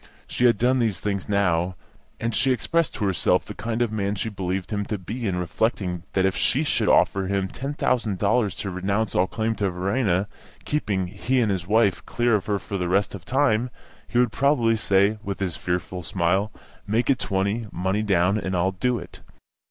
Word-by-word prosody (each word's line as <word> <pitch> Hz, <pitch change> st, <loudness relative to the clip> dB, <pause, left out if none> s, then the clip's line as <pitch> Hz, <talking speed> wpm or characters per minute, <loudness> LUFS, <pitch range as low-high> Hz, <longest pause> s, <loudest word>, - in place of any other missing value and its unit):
She 125 Hz, -, 0 dB
had 120 Hz, -3 st, +5 dB
done 125 Hz, +4 st, +2 dB
these 110 Hz, -6 st, 0 dB
things 100 Hz, -1 st, -3 dB
now, 90 Hz, -3 st, +1 dB, 0.4 s
and 115 Hz, 0 st, -2 dB
she 130 Hz, +4 st, +2 dB
expressed 130 Hz, -, 0 dB
to 105 Hz, -, -1 dB
herself 95 Hz, -4 st, +2 dB
the -, -, -7 dB
kind 115 Hz, +2 st, -1 dB
of 115 Hz, -, -2 dB
man 100 Hz, -1 st, -1 dB
she 110 Hz, +3 st, -2 dB
believed 95 Hz, -1 st, -3 dB
him 105 Hz, -1 st, -1 dB
to 105 Hz, -, -3 dB
be 110 Hz, +5 st, -5 dB
in 95 Hz, -, 0 dB
reflecting 90 Hz, 0 st, -1 dB
that 95 Hz, -1 st, +2 dB
if 95 Hz, -, +1 dB
she 140 Hz, +5 st, +2 dB
should 150 Hz, -, +1 dB
offer 95 Hz, -1 st, +3 dB
him 95 Hz, -1 st, 0 dB
ten 135 Hz, +8 st, -5 dB
thousand 115 Hz, -8 st, 0 dB
dollars 105 Hz, 0 st, +1 dB
to 100 Hz, -, -4 dB
renounce 100 Hz, +3 st, -1 dB
all 90 Hz, +1 st, +2 dB
claim 110 Hz, +2 st, -1 dB
to 100 Hz, -2 st, +1 dB
Verena, 95 Hz, +1 st, 0 dB, 0.4 s
keeping 105 Hz, -11 st, -1 dB
he 125 Hz, +8 st, -1 dB
and 110 Hz, -4 st, +2 dB
his 90 Hz, -2 st, -3 dB
wife 105 Hz, -3 st, +2 dB
clear 120 Hz, 0 st, +1 dB
of 105 Hz, -3 st, +1 dB
her 105 Hz, -1 st, +1 dB
for 100 Hz, 0 st, -5 dB
the 90 Hz, -1 st, -1 dB
rest 100 Hz, +2 st, +1 dB
of 95 Hz, -3 st, -8 dB
time, 130 Hz, -3 st, +2 dB, 0.4 s
he -, -, -2 dB
would 120 Hz, -2 st, +3 dB
probably 125 Hz, -5 st, +2 dB
say, 100 Hz, 0 st, +2 dB
with 100 Hz, -1 st, -4 dB
his 90 Hz, -5 st, -2 dB
fearful 90 Hz, 0 st, -3 dB
smile, 95 Hz, +3 st, 0 dB, 0.4 s
"Make 115 Hz, +6 st, +2 dB
it 130 Hz, -, +1 dB
twenty, 100 Hz, +4 st, -1 dB
money 95 Hz, +4 st, -1 dB
down, 100 Hz, 0 st, +2 dB
and 95 Hz, -2 st, -3 dB
I'll 90 Hz, +2 st, +2 dB
do 120 Hz, +6 st, 0 dB
it." 85 Hz, -, -10 dB
100 Hz, 205 wpm, -24 LUFS, 95-115 Hz, 0.4 s, had